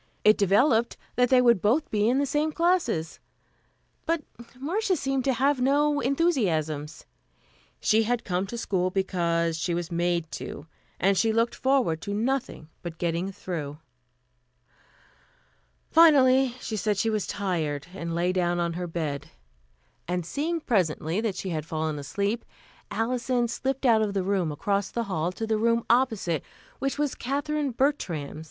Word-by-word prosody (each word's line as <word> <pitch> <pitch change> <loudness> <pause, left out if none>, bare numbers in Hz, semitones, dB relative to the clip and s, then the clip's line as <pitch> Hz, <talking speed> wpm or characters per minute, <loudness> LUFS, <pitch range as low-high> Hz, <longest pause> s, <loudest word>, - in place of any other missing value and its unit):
It 215 +1 +7
developed 220 +4 +3 0.2
that 250 -1 +3
they 255 -1 +5
would 235 -6 +4 0.3
be 210 +1 +2
in 255 - +2
the 285 - +2
same 295 +3 0
classes; 335 - 0 0.9
but 330 -2 0 0.4
Marcia 375 +7 0
seemed 270 -3 -1
to 270 - +3
have 270 +2 +1
no 290 +2 +3
enthusiasms. 175 - 0 0.7
She 220 +1 +3
had 235 +1 0
come 185 +1 -1
to 235 - -6
school 185 -5 0
because 170 -3 0
she 170 +1 -1
was 175 0 -4
made 170 -1 0
to, - - -7 0.3
and 195 +3 +3
she 225 +3 +2
looked 230 +2 +1
forward 255 - +1
to 200 - -3
nothing 245 - -2
but 170 -2 -7
getting 170 +3 -1
through. 160 -7 -5 2.1
Finally 270 -6 +6
she 220 - -4
said 210 0 0
she 225 +3 +1
was 215 -2 -1
tired 160 -8 -2
and 170 -3 -4
lay 175 +2 +1
down 175 -1 +1
on 170 -1 0
her 175 +1 -4
bed; 155 -4 -4 0.8
and 180 -1 -2
seeing 320 - -2
presently 180 - 0
that 220 -4 -1
she 190 - -4
had 155 -3 -2
fallen 155 -1 -3
asleep, 200 +10 -2 0.5
Alison 245 +1 0
slipped 270 +3 -2
out 225 -3 +5
of 205 -2 -1
the 195 - +1
room 185 -4 0
across 200 +6 -1
the 235 - -2
hall 180 -5 -1
to 225 - -4
the 220 -1 0
room 230 +1 +2
opposite, 220 - +1 0.4
which 275 +1 -1
was 295 -2 0
Katherine 285 +2 -2
Bertram's. 210 - -1
210 Hz, 155 wpm, -26 LUFS, 170-260 Hz, 2.1 s, It